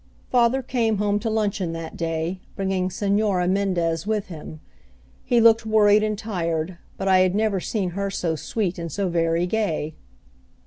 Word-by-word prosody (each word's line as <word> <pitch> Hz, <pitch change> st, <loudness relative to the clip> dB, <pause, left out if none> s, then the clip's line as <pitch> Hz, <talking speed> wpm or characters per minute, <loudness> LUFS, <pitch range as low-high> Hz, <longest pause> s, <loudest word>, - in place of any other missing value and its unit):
Father 250 Hz, +1 st, +3 dB
came 230 Hz, -4 st, 0 dB
home 205 Hz, 0 st, +1 dB
to 225 Hz, -, -2 dB
luncheon 205 Hz, -5 st, -1 dB
that 165 Hz, -1 st, -6 dB
day, 165 Hz, +2 st, -2 dB, 0.2 s
bringing 190 Hz, -2 st, -1 dB
Señora 200 Hz, -1 st, +1 dB
Mendez 180 Hz, -3 st, 0 dB
with 215 Hz, -3 st, -1 dB
him. 155 Hz, -2 st, -9 dB, 0.6 s
He 240 Hz, -, +2 dB
looked 225 Hz, -1 st, +6 dB
worried 215 Hz, -1 st, +4 dB
and 215 Hz, -1 st, -1 dB
tired, 170 Hz, -5 st, -3 dB, 0.2 s
but 195 Hz, -, -3 dB
I 190 Hz, -1 st, +5 dB
had 185 Hz, 0 st, +3 dB
never 210 Hz, -2 st, +1 dB
seen 190 Hz, -1 st, -2 dB
her 200 Hz, +2 st, -2 dB
so 170 Hz, -4 st, -1 dB
sweet, 185 Hz, +2 st, -2 dB
and 170 Hz, -1 st, -5 dB
so 195 Hz, +3 st, -1 dB
very 165 Hz, 0 st, +1 dB
gay. 175 Hz, -6 st, -1 dB
195 Hz, 165 wpm, -23 LUFS, 170-215 Hz, 0.6 s, looked